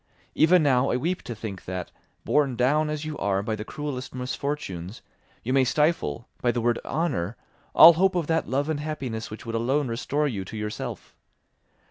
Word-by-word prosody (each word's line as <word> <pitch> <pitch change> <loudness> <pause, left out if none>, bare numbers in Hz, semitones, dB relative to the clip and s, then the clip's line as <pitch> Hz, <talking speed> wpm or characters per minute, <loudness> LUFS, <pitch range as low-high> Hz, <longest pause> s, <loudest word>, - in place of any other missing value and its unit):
Even 165 +1 +5
now 135 -2 +3
I - - +1
weep 175 +7 -1
to 120 - -5
think 105 -3 -7
that, 90 -1 -5 0.3
borne 140 -4 +2
down 150 +6 +2
as 150 0 -3
you 155 -1 -5
are 100 -1 0
by 110 +1 -2
the 105 - -5
cruellest 135 0 -6
misfortunes, 125 - -4 0.4
you 125 - -1
may 135 -1 +5
stifle, 135 - 0
by 120 - +3
the 120 - -2
word 120 0 +1
honour, 120 - -2 0.4
all 170 - +11
hope 185 +3 +2
of 175 -3 0
that 165 +1 0
love 140 +3 0
and 155 -2 -1
happiness 140 -7 -4
which 105 - -9
would 115 - -5
alone 130 +4 0
restore 145 +6 -1
you 105 -8 -3
to 110 - -8
yourself. 105 0 -5
130 Hz, 185 wpm, -26 LUFS, 110-150 Hz, 0.4 s, all